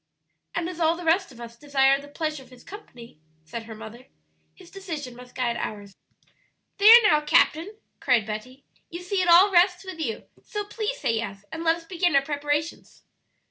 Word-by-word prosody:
"And 335 0 -2
as 355 -1 -7
all 325 0 +2
the 355 - -8
rest 335 +1 +1
of 240 - -15
us 235 -1 -10
desire 275 +1 +2
the 285 - -13
pleasure 305 0 -4
of 260 - -17
his 250 -1 -17
company," 240 - -13 0.3
said 225 +8 -7
her 225 -1 -9
mother, 225 +4 -11 0.5
"his 365 -2 -17
decision 315 -10 -7
must 250 0 -14
guide 240 -2 -1
ours." 205 -2 -6 0.8
"There, 450 +4 +9
now, 300 -8 +4
captain," 325 +6 +1 0.2
cried 245 -6 +2
Betty, 245 +6 -7 0.3
"you 345 +1 -8
see 375 +1 -1
it 360 - 0
all 355 +4 +7
rests 360 +1 +3
with 375 -3 -8
you; 235 -9 -4 0.2
so 415 -1 -5
please 445 +4 -4
say - - 0
yes, 205 -3 -5
and 325 +1 -6
let 325 0 +3
us 335 0 -13
begin 350 -2 0
our 275 - +4
preparations." 290 +2 -4
300 Hz, 190 wpm, -25 LUFS, 245-355 Hz, 0.8 s, There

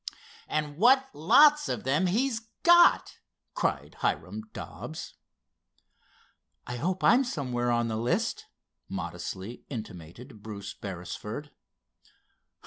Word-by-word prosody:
"And 150 -1 -2
what 265 +6 +5
lots 290 - +5
of - - -3
them 145 +8 +1
he's 230 +5 +1 0.2
got!" 345 0 +5 0.3
cried - - -2
Hiram 220 - -2
Dobbs. 160 -6 -8 1.5
"I 125 - -5
hope 180 +7 -2
I'm 245 +6 +6
somewhere 125 - -2
on 120 -1 +1
the 110 -1 -2
list," 120 +2 -1 0.4
modestly 100 +6 -6
intimated 110 - -9
Bruce 100 -2 -7
Beresford. 100 - -7
145 Hz, 100 wpm, -28 LUFS, -, 1.5 s, I'm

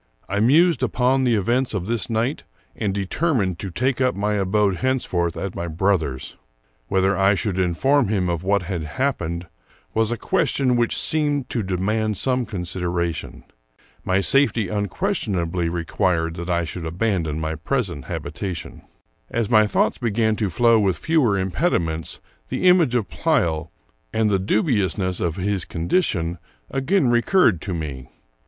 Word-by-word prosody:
I 100 +2 -1
mused 145 +5 +4
upon 130 +2 +2
the 120 -2 +3
events 120 +4 0
of 90 -3 -2
this 115 -2 -1
night, 115 +6 -1 0.3
and 105 -3 -1
determined 100 - 0
to 100 - -4
take 130 +7 -1
up 125 -1 +2
my 105 +2 0
abode 100 -1 +1
hence 130 +3 0
forth 85 -2 -1
at 95 -1 -4
my 85 - -4
brother's. 80 -6 -1 0.5
Whether 95 +1 +2
I 95 +1 +3
should 95 -2 -2
inform 125 +10 +2
him 95 -3 0
of 85 -2 -1
what 100 +1 +1
had 90 -2 -3
happened 85 - -2 0.5
was 110 0 +1
a 120 - -1
question 140 - +1
which 120 -1 +1
seemed 145 -4 0
to 115 - 0
de 95 -2 -2
mand 105 +2 0
some 125 0 0
consideration. 90 -3 -3 0.6
My 95 +1 +1
safety 115 -4 +3
unquestionably 95 - -1
re 85 0 -3
quired 85 -3 0
that 85 +1 -5
I 85 -1 +1
should 85 0 -5
abandon 85 -4 -1
my 80 0 -2
present 85 - -2
habitation. 95 -4 -5 0.5
As 115 -2 -1
my 110 -2 +6
thoughts - - +1
began 110 -2 +1
to 105 -3 0
flow 115 +6 +4
with 95 -5 +1
fewer 140 -11 +2
impediments, 90 - -1 0.3
the 185 - 0
image 170 -9 +5
of 115 -5 0
Pleyel, 85 - 0 0.4
and 110 -1 +1
the 100 - +2
dubiousness 95 - 0
of 85 -3 -1
his 100 -1 -1
condition, 85 - -1 0.3
again 140 +3 +1
recurred 120 - +3
to 95 -4 -3
me. 70 -6 -6
100 Hz, 155 wpm, -22 LUFS, 90-120 Hz, 0.6 s, my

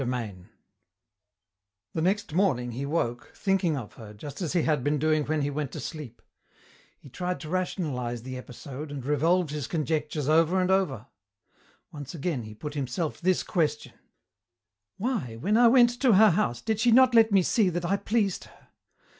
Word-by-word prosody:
CHAPTER 125 -1 -1
IX 95 - -15 1.6
The 160 - -2
next 195 0 0
morning 145 -10 +1
he 135 +4 -4
woke, 120 -6 -2
thinking 190 -6 +1
of 120 -6 -7
her, 105 -2 -12
just 145 - -9
as 170 -3 -2
he 175 -3 +2
had 150 -5 +1
been 145 +2 +1
doing 155 0 +1
when 155 -1 -1
he 145 - -1
went 145 -1 -3
to 155 - -5
sleep. 140 -4 -8 0.7
He - - -16
tried 180 +7 -4
to 155 - -8
rationalize 140 - -2
the 130 0 -6
episode 130 +3 -8
and 140 -3 -7
revolved 160 +3 +2
his 150 -3 -4
conjectures 150 -2 -2
over 165 +4 +3
and 185 0 +1
over. 165 - 0 0.9
Once 145 +1 -8
again 155 -3 -2
he 110 -1 -10
put 145 +7 -7
himself 145 +3 -3
this 185 +1 +2
question: 165 -5 -1 1.0
"Why, 205 - -2
when 190 - 0
I 240 +1 +6
went 240 0 +6
to 255 -5 +5
her 215 +1 +7
house, 120 -8 0
did 220 -2 -1
she 235 +2 +3
not 255 +1 +6
let 225 -1 +5
me 195 -2 +4
see 210 0 +2
that 175 0 -3
I 195 +3 +1
pleased 200 -1 -1
her? - - -21
155 Hz, 180 wpm, -27 LUFS, 135-185 Hz, 1.6 s, her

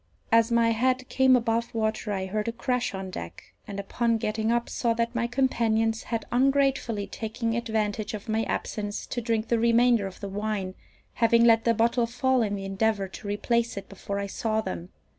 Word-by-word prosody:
As 230 +1 +4
my 230 -1 +4
head 255 +2 +1
came 260 -1 +5
above 230 -1 0
water 220 -1 -1
I 190 -2 -2
heard 210 +3 -2
a - - +1
crash 250 -2 -1
on 190 -1 -5
deck, - - -9
and, 200 -2 -5
upon 230 +3 0
getting 220 +1 -1
up, 235 0 +1
saw 235 -2 0
that 230 +1 -1
my 235 -1 0
companions 225 -3 +1
had 230 -1 -3
ungratefully 265 -5 +2
taken 225 +3 -3
advantage 220 -2 -1
of 205 - -9
my 220 0 +1
absence 205 -1 -3
to 240 - -4
drink 225 -1 -1
the 235 - +2
remainder 235 -2 +4
of 190 - -10
the 200 - -5
wine, 200 -1 -3 0.4
having 230 0 +4
let 225 -1 +5
the 230 -1 +3
bottle 235 +1 +2
fall 255 +2 +1
in 205 -2 0
the 195 -1 -5
endeavour 195 +1 0
to 205 - -9
replace 230 +2 0
it 195 - -6
before 200 0 -5
I 200 - -2
saw 215 +2 -1
them. 185 -4 -5
225 Hz, 195 wpm, -27 LUFS, 210-235 Hz, 0.4 s, came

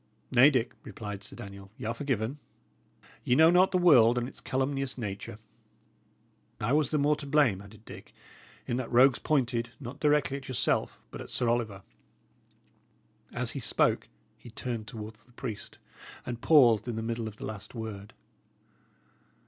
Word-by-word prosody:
"Nay, 130 +3 +7
Dick," 125 -5 0
replied 105 -1 -7
Sir - - -9
Daniel, 100 -1 -10
"y' - - -7
are 115 - -1
forgiven. 135 -1 -2 0.8
Ye 125 - +2
know 160 +4 +7
not 180 +2 +5
the 185 - +1
world 125 -10 +6
and 120 0 -1
its - - -12
calumnious 135 0 -2
nature." 100 -3 -5 1.2
"I 115 +6 0
was 150 -3 +3
the 155 - 0
more 145 +1 +3
to 145 - -8
blame," 140 -9 +3
added 105 +2 -15
Dick, - - -11 0.5
"in 120 - -2
that 130 - -2
the - - -11
rogues 130 +1 +6
pointed, 120 -5 0
not 130 -1 -8
directly 145 -2 +2
at 135 - -10
yourself, 130 - 0
but - - -7
at - - -9
Sir 120 - 0
Oliver." 110 -5 -1 1.5
As - - -3
he - - -5
spoke, - - +1 0.3
he 120 - -12
turned 115 -1 -5
towards 110 -1 -9
the 125 - -25
priest, 110 -5 -7 0.5
and 120 -1 -5
paused 125 -8 +5
in 120 - -3
the 110 - -3
middle 115 0 -3
of 105 - -8
the - - -7
last 110 +2 -8
word. 105 -3 -7
120 Hz, 170 wpm, -29 LUFS, 110-140 Hz, 1.5 s, Nay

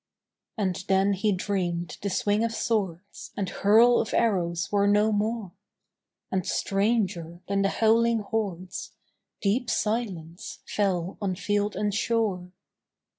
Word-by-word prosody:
And 185 -4 -1
then 195 +1 +3
he 200 +2 +1
dreamed 180 -4 -2
the 200 - -2
swing 205 +3 +1
of 230 - 0
swords 200 -5 -2
And 200 - -1
hurl 230 +4 +5
of 225 - -1
arrows 180 -6 +1
were 200 -1 +3
no 210 +2 +4
more; 215 -1 -1 0.8
And 190 -1 0
stranger 195 -5 -1
than 200 0 +1
the 195 - +2
howling 230 +1 +3
hordes 195 -4 -4 0.5
Deep 230 +5 +1
silence 195 -7 -2
fell 190 -3 -1
on 190 -3 -1
field 205 +2 -1
and 205 +1 -1
shore. 210 -5 0
200 Hz, 125 wpm, -26 LUFS, 185-215 Hz, 0.8 s, hurl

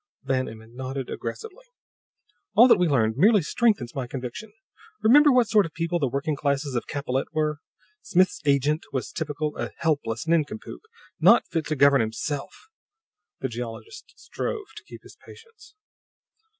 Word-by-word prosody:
Van 130 -1 -1
Emmon 110 +1 -13
nodded 130 0 -5
aggressively. - - -7 0.9
"All 240 +3 +8
that 240 - +5
we 180 - +3
learned 115 -6 +1
merely 205 +3 +5
strenthens 175 - 0
my 130 -3 -4
conviction. 130 - -7 0.5
Remember 290 +6 +7
what 250 -3 +4
sort 210 -1 +4
of 160 - -18
people 170 0 -1
the 140 - +1
working 140 +4 -2
classes 140 -1 -1
of 120 - -3
Capellette 135 -2 -3
were? 155 -1 -1 0.4
Smith's 185 +1 +1
'agent' 145 +1 +1
was 130 -2 -3
typical 150 -1 -3
a - - -3
helpless 145 -8 -1
nincompoop, 170 +7 -1 0.4
not - - +6
fit 165 -2 -3
to 155 - -1
govern 140 -2 +5
himself!" 135 - -5 0.7
The 130 - -1
geologist 120 - -8
strove 425 -4 -5
to - - -11
keep - - -12
his - - -16
patience. 450 -2 -16
150 Hz, 150 wpm, -25 LUFS, 130-200 Hz, 0.9 s, All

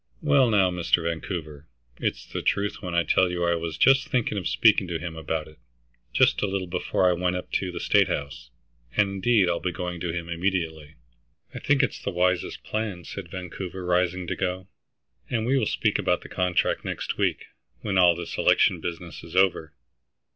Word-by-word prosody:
"Well, 140 -4 +4
now, 95 -4 +3
Mr. 90 -1 +1
Vancouver, 80 -3 -5 0.3
it's - - -2
the - - -5
truth 100 +1 -1
when 90 -3 -4
I 85 - +3
tell 95 +2 +3
you 90 0 -2
I 85 - +2
was 85 -1 -3
just 135 +8 +4
thinking 120 -4 0
of 100 - -2
speaking 105 -4 +4
to 85 -1 -2
him 80 0 -6
about 80 0 -3
it, 75 - -17 0.5
just - - +3
a 105 - +1
little, 95 -1 -2
before 90 +1 0
I 90 - +4
went 90 +1 0
up 90 - -6
to 95 -2 -1
the 85 - -6
State - - +3
House. 70 -4 -5 0.5
And 105 - +4
indeed 100 +1 +2
I'll 85 -1 0
be 90 - -2
going 90 0 -5
to 85 0 -2
him 85 0 -4
immediately." 85 -3 -2 0.6
"I - - -6
think - - +2
it - - +1
is - - -10
the - - -2
wisest 90 0 0
plan," 105 -5 -3
said 95 -1 -8
Vancouver, 95 0 -6
rising 90 +1 +1
to - - -3
go, 90 +1 -3 0.6
"and 115 -2 -1
we 130 +3 +2
will 115 -6 +2
speak - - 0
about - - +1
the - - -11
contract 90 -1 0
next - - -4
week, - - 0 0.4
when 95 -3 0
all 90 -2 +6
this 85 0 -6
election - - +3
business 85 0 -6
is 85 - -10
over." 95 -5 +2
90 Hz, 200 wpm, -25 LUFS, 85-95 Hz, 0.6 s, all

